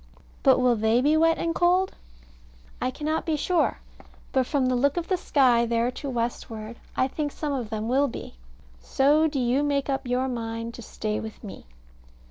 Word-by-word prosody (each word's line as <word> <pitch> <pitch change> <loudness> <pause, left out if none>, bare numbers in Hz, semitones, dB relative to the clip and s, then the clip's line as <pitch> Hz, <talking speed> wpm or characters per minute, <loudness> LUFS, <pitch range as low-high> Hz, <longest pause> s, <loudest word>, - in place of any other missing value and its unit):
But - - +5
will 250 -1 +3
they 220 +2 +2
be 295 +4 +3
wet 330 +1 +4
and 330 - -1
cold? 360 +2 +2 0.9
I 255 - +1
cannot 310 +4 -2
be 320 -2 0
sure; 345 +3 +1 0.5
but 260 -2 +1
from 280 -3 +1
the 255 0 +1
look 280 +5 +1
of 345 - -3
the 375 - +3
sky 250 -8 +3
there 235 +1 +1
to 280 +2 -6
westward, 230 -2 -4 0.2
I 255 - +3
think 295 +2 -3
some 295 -1 -3
of 245 -5 -3
them 220 0 -3
will 270 +4 +3
be. 240 - -8 0.5
So 295 - +3
do 290 -3 -2
you 250 +3 +2
make 285 -1 0
up 270 -1 -2
your 250 +1 0
mind 230 -2 -4
to 235 - -9
stay 215 -1 -3
with 220 -1 -8
me. 200 - -10
260 Hz, 190 wpm, -26 LUFS, 235-295 Hz, 0.9 s, But